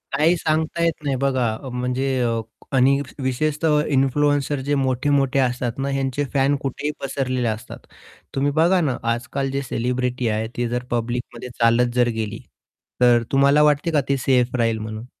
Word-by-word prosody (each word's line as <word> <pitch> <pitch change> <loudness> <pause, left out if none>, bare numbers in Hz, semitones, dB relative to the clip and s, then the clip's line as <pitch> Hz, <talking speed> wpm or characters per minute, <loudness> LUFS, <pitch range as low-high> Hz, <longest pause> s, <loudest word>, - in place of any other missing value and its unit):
काही 160 +5 +4
सांगता 160 +2 0
येत 165 -2 -1
नाही 140 -2 0
बघा. 130 -2 +1 0.2
अ, 130 - -6
म्हणजे 125 +2 -1
अ, 115 -1 0 0.4
आणि 135 +2 +4 0.2
विशेषतः 150 +3 +1
इन्फ्लुएन्सर 145 +1 +1
जे 145 0 +1
मोठे-मोठे 135 +1 +1
असतात 125 -1 -1
ना, 135 +1 -2
ह्यांचे 135 +1 -1
फॅन 140 +1 +3
कुठेही 145 +2 -3
पसरलेले 130 -3 -1
असतात. 110 0 -5 0.5
तुम्ही 140 +1 +1
बघा 180 +3 +4
ना 135 -6 0
आजकाल 135 +3 -2
जे 140 0 -1
सेलिब्रिटी 125 0 -2
आहे, 110 +1 -1
ती 120 -1 0
जर 125 +1 -2
पब्लिकमध्ये 120 +1 -3
चालत 120 +1 +3
जर 120 -1 +3
गेली. 110 0 -3 0.6
तर 120 -1 +5
तुम्हाला 140 +2 +4
वाटते 150 +3 +2
का 150 -2 +3
ते 140 - +2
सेफ 125 -1 +1
राहील 115 -2 +1
म्हणून? 110 +2 -6
130 Hz, 160 wpm, -22 LUFS, 120-145 Hz, 0.6 s, तर